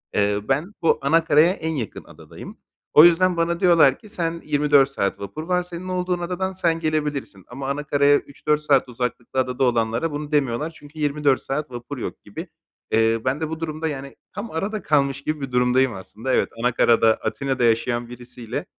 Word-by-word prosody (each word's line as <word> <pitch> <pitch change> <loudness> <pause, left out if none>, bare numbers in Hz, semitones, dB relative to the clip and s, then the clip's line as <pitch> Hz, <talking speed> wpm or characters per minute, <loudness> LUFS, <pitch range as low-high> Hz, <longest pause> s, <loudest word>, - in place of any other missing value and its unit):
Eee, 100 0 +2
ben 150 +10 0
bu 165 - +3
ana 160 +4 +3
karaya 160 +2 +5
en 160 -4 -4
yakın 115 -8 -5
adadayım. - - -12 0.4
O 150 - +9
yüzden 175 +1 +4
bana 170 0 0
diyorlar 170 -7 +5
ki 215 - -15
"Sen 170 -4 -1
24 145 -2 +3
saat 100 -7 -2
vapur 100 +10 -6
var, 180 +1 0
senin 180 +1 -8
olduğun 180 -1 -1
adadan 185 +2 -3
sen 170 -3 +1
gelebilirsin." 150 - -3
ama 135 +2 -6
ana 145 +2 -2
karaya 145 0 +3
3-4 150 +1 -2
saat 140 -4 +2
uzaklıkta 125 +1 -3
adada 125 0 0
olanlara 120 +4 +1
bunu 150 +1 -5
demiyorlar 145 +1 0
çünkü 150 +1 -14
24 145 -2 +1
saat 150 +1 -4
vapur 120 +4 -7
yok 120 - -6
gibi. 160 - -8 0.4
Eee, 115 0 +2
ben 135 +4 0
de 160 - -2
bu 160 0 -5
durumda, 160 0 -3
yani, 140 -2 -6 0.2
tam 230 - -6
arada 200 +6 -3
kalmış 140 -2 +1
gibi 155 0 -3
bir 135 -2 -5
durumdayım 125 0 +2
aslında. 110 +6 -5
Evet, - - +2
ana 125 +2 +2
karada, 115 -2 +4
Atina'da 135 -3 -2
yaşayan 120 +1 +1
birisiyle, 120 -1 -6
145 Hz, 185 wpm, -22 LUFS, 125-165 Hz, 0.4 s, O